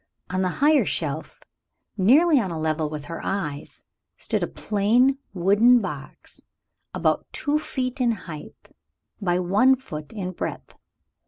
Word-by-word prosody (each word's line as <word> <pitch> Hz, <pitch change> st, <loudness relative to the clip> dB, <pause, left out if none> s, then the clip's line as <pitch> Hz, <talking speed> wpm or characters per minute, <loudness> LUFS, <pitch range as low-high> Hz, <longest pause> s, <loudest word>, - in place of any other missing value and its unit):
On 185 Hz, +1 st, 0 dB
the 185 Hz, -, +1 dB, 0.2 s
higher 300 Hz, -1 st, +5 dB
shelf, -, -, -3 dB, 0.6 s
nearly 280 Hz, -, +5 dB
on 200 Hz, -6 st, -2 dB
a 165 Hz, -, -4 dB
level 155 Hz, -1 st, -1 dB
with 150 Hz, -1 st, -6 dB
her 165 Hz, +2 st, -6 dB
eyes, 150 Hz, -7 st, -4 dB, 0.3 s
stood -, -, -2 dB
a -, -, 0 dB
plain 240 Hz, +7 st, +2 dB
wooden 205 Hz, +7 st, +4 dB
box 150 Hz, -, -8 dB, 0.5 s
about -, -, 0 dB
two 295 Hz, +1 st, 0 dB
feet 260 Hz, -3 st, -3 dB
in 240 Hz, -1 st, +3 dB
height 165 Hz, -7 st, -10 dB, 0.5 s
by 175 Hz, -3 st, +1 dB
one 205 Hz, +9 st, +4 dB
foot 155 Hz, -, -9 dB
in 190 Hz, -4 st, -4 dB
breadth. 185 Hz, -, -6 dB
195 Hz, 140 wpm, -24 LUFS, 170-255 Hz, 0.6 s, higher